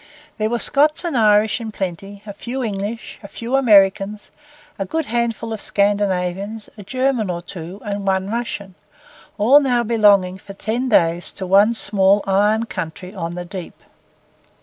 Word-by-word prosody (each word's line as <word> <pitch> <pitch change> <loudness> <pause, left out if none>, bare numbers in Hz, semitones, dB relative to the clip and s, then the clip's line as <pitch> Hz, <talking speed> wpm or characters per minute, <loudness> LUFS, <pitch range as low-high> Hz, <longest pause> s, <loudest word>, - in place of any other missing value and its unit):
There 215 0 0
were 240 - 0
Scots 300 +7 +2
and 335 -5 -2
Irish 215 0 +3
in 220 -1 -5
plenty, 195 +1 -6
a 205 - -7
few 250 +6 -5
English, 210 +1 -5
a 200 - -9
few 230 +5 -4
Americans, 205 -4 +3 0.5
a - - 0
good 320 +11 -2
handful 230 -1 -2
of 220 - -5
Scandinavians, 200 +1 -1
a 210 - -11
German 255 0 -1
or 170 -1 -4
two, 180 +2 -8
and 200 -1 -4
one 190 +1 0
Russian; 225 -5 -4 0.6
all 245 +8 +6
now 250 -4 +1
belonging 205 -5 +3
for 195 - -11
ten 230 +6 -2
days 170 -5 +2
to 190 - -5
one 200 +5 +4
small 200 -1 +2
iron 210 +3 +2
country 180 -1 -6
on 170 -3 -5
the 180 0 -5
deep. 185 -1 -8
205 Hz, 160 wpm, -20 LUFS, 190-230 Hz, 0.6 s, all